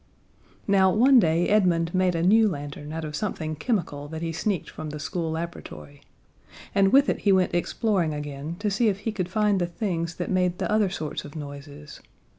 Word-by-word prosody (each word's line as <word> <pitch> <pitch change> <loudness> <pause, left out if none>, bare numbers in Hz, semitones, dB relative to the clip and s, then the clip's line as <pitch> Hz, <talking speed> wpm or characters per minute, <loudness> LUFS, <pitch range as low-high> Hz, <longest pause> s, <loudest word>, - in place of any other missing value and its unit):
Now, 195 -2 +4
one 255 +6 +6
day 170 -2 +2
Edmund 175 -5 +2
made 185 -1 +2
a 165 - 0
new 215 +4 +5
lantern 145 -2 -6
out 160 0 -4
of 150 -1 -5
something 155 -5 -3
chemical 155 - -2
that 160 +2 -6
he 165 - -2
sneaked 185 +3 -2
from 155 -1 -7
the 150 0 -6
school 165 +2 -3
laboratory. 80 - -7 0.7
And 195 -1 +3
with 275 +1 +5
it - - 0
he 200 - +2
went 185 -1 +3
exploring 175 -1 0
again 145 +1 -5
to 205 +1 -1
see 220 +4 +2
if 200 -1 0
he 225 - -2
could 185 -4 -3
find 210 -1 +1
the 175 - 0
things 170 -2 -3
that 175 - -4
made 180 -1 +1
the - - -2
other 215 -2 +3
sorts 160 -5 -5
of 145 - -11
noises. 145 0 -9
175 Hz, 200 wpm, -25 LUFS, 155-200 Hz, 0.7 s, one